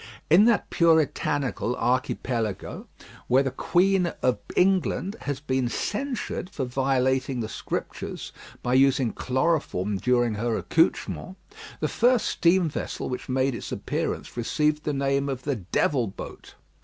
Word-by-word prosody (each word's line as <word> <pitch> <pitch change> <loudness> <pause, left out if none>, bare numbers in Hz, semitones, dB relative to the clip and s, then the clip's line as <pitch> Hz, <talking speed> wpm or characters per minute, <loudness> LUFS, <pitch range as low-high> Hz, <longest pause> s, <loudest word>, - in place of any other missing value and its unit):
In 185 +6 +7
that 235 -2 +2
Puritanical 145 -6 +2
Archipelago, 120 -4 -2 0.4
where 130 +2 +4
the 135 - -1
Queen 185 +3 +2 0.2
of 125 -1 +2 0.2
England 190 +1 +2
has 145 -2 -3
been 130 -4 -1
censured 215 - -3
for 145 -9 -3
violating 130 0 0
the 110 - -2
Scriptures - - -5 0.3
by 125 - 0
using 130 -2 +3
chloroform 130 - 0
during 120 +1 +2
her 115 +2 -1
accouchments, 170 +2 0 0.5
the - - +1
first 245 -1 +3
steam 175 0 +3
vessel 155 - -4
which 125 - -5
made 130 +1 +1
its 115 - -6
appearance - - -3
received 150 +5 0
the 150 - +1
name 140 0 0
of 130 -2 -4
the 145 -2 -1
"Devil 115 +6 0
Boat." 95 - -9
135 Hz, 130 wpm, -26 LUFS, 125-165 Hz, 0.5 s, In